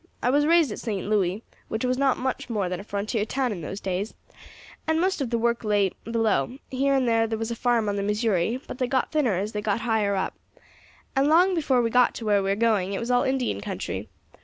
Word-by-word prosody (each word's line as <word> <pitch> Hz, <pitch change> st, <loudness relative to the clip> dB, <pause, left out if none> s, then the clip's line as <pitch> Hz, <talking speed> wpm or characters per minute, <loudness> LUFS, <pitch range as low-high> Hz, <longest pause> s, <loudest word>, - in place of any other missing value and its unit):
I 250 Hz, -, +3 dB
was 290 Hz, +2 st, +3 dB
raised 330 Hz, -6 st, +4 dB
at -, -, -5 dB
St. 205 Hz, -5 st, -3 dB
Louis, 205 Hz, 0 st, +1 dB, 0.2 s
which 220 Hz, +3 st, -2 dB
was 250 Hz, 0 st, +1 dB
not 270 Hz, 0 st, +2 dB
much 260 Hz, -1 st, -3 dB
more 210 Hz, -5 st, -1 dB
than 180 Hz, 0 st, -3 dB
a -, -, -7 dB
frontier 205 Hz, +2 st, -2 dB
town 255 Hz, +3 st, -1 dB
in 185 Hz, -5 st, -5 dB
those 190 Hz, +6 st, -5 dB
days, 190 Hz, +2 st, -3 dB, 0.7 s
and 320 Hz, 0 st, +2 dB
most 370 Hz, -2 st, +1 dB
of 260 Hz, -, -1 dB
the 235 Hz, -, 0 dB
work 235 Hz, +1 st, 0 dB
lay 205 Hz, -3 st, +2 dB
below; 225 Hz, -, 0 dB
here 275 Hz, +1 st, +2 dB
and 260 Hz, -2 st, +2 dB
there 225 Hz, -1 st, +3 dB
there 225 Hz, 0 st, -2 dB
was 225 Hz, +1 st, -3 dB
a -, -, -2 dB
farm 235 Hz, -2 st, +1 dB
on 205 Hz, 0 st, -1 dB
the -, -, 0 dB
Missouri, 210 Hz, +1 st, 0 dB
but -, -, -7 dB
they 255 Hz, -, +1 dB
got 260 Hz, 0 st, 0 dB
thinner 280 Hz, -10 st, +2 dB
as 200 Hz, +4 st, -2 dB
they 210 Hz, -, -3 dB
got 210 Hz, +1 st, -1 dB
higher 215 Hz, -4 st, +1 dB
up, 190 Hz, -, -1 dB, 0.8 s
and 270 Hz, +1 st, +3 dB
long 355 Hz, +5 st, +5 dB
before 270 Hz, -7 st, +2 dB
we 230 Hz, -, 0 dB
got 250 Hz, 0 st, +4 dB
to 230 Hz, -, -6 dB
where 205 Hz, -2 st, +3 dB
we 195 Hz, -, -1 dB
are 195 Hz, -, +2 dB
going 205 Hz, -3 st, +1 dB
it -, -, -2 dB
was 235 Hz, +2 st, -2 dB
all 245 Hz, 0 st, +4 dB
Indian 255 Hz, -, -1 dB
country. -, -, -5 dB
230 Hz, 245 wpm, -25 LUFS, 205-255 Hz, 0.8 s, long